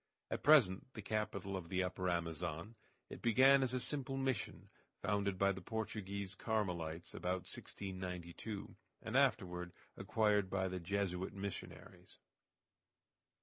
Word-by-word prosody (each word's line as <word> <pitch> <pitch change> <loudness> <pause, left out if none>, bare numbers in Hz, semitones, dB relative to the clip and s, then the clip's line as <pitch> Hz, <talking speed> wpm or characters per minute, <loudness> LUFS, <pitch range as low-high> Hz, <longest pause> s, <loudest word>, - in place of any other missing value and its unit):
At - - -1
present 130 -5 +5
the 110 - -6
capital 100 -2 -2
of 90 -3 -5
the 95 0 +1
Upper 90 0 -1
Amazon, 85 +2 -2 0.4
it - - -7
began 130 +4 +6
as 130 -2 +2
a 130 - +1
simple 135 0 0
Mission, 130 -5 -2 0.3
founded 100 -2 +1
by 100 +1 +4
the 95 0 -5
Portuguese 100 -2 -3
Carmelites 90 -7 -2
about 90 +1 -1
1692, 95 +2 -5 0.3
and 115 - -4
afterward 90 -10 +2 0.2
acquired 105 0 +2
by 95 -1 +1
the 90 0 -3
Jesuit 95 0 -1
missionaries. 100 -1 -7
100 Hz, 125 wpm, -38 LUFS, 90-110 Hz, 0.4 s, began